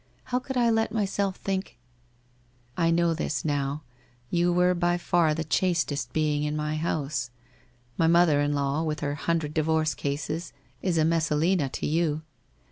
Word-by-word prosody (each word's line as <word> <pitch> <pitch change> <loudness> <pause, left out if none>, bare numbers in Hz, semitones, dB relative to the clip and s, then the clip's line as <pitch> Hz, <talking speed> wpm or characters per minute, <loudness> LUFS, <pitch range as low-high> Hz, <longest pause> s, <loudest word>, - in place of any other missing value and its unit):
How 250 0 -1
could 265 0 -5
I 235 -1 +4
let 225 0 +1
myself 200 -2 -1
think? 190 -6 -4 1.0
I 165 -1 +2
know 170 0 +3
this 155 -2 -2
now, 145 0 -1 0.5
you 175 0 +2
were 180 +1 +3
by 175 0 +1
far 170 -3 +2
the 160 - -2
chastest 160 -6 0
being 150 -1 +1
in 150 0 -1
my 150 0 -2
house. 155 -5 -2 0.7
My 165 - +4
mother 165 -3 +5
in 145 0 +1
law, 140 +2 0
with 155 -2 -2
her 145 -1 -1
hundred 155 0 -1
divorce 155 -1 +1
cases, 145 +4 -3 0.3
is 180 -3 0
a 155 - +3
Messalina 165 -1 +1
to - - -4
you. 155 -1 0
160 Hz, 160 wpm, -27 LUFS, 150-175 Hz, 1.0 s, mother